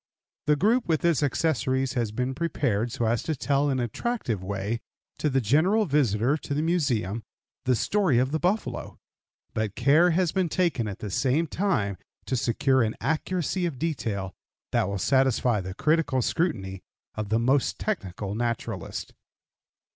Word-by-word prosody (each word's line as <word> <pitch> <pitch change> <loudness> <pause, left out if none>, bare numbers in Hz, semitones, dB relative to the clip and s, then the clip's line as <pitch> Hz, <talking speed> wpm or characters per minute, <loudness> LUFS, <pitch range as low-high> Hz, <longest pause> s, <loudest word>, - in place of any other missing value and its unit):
The 150 - +5
group, 225 - +2
with 160 -1 +1
its 170 -4 +3
accessories, 135 -3 +1
has 120 -5 -1
been 125 +4 -2
prepared 130 -7 -1
so 120 -2 -1
as 115 +1 +1
to 160 - -2
tell 140 +1 +1
in 135 - +1
an 125 - 0
attractive 120 - -2
way 100 +4 -2 0.4
to 150 - +1
the 135 -1 +2
general 160 - +3
visitor 135 - +2
to 145 - -4
the 150 - 0
Museum 125 - 0 0.4
the 130 0 +3
story 190 - +2
of 130 +2 +2
the 160 - 0
buffalo, 190 +6 -1 0.6
but 110 -1 -2
care 145 +8 +5
has 175 -1 +2
been 185 -3 0
taken 165 - +1
at 100 - -5
the 105 - -6
same 135 - +2
time 155 - -1 0.3
to 130 - -1
secure 130 +2 +2
an 110 -1 0
accuracy 175 +2 -1
of 150 -6 -5
detail 110 - -2 0.4
that 95 - +1
will 100 - -2
satisfy 125 -1 +2
the 95 0 -6
critical 145 -2 +2
scrutiny 100 - -1 0.3
of 110 -2 -4
the 110 - +3
most 130 +4 +2
technical 100 - -3
naturalist. 115 +1 -3
130 Hz, 160 wpm, -26 LUFS, 110-160 Hz, 0.6 s, The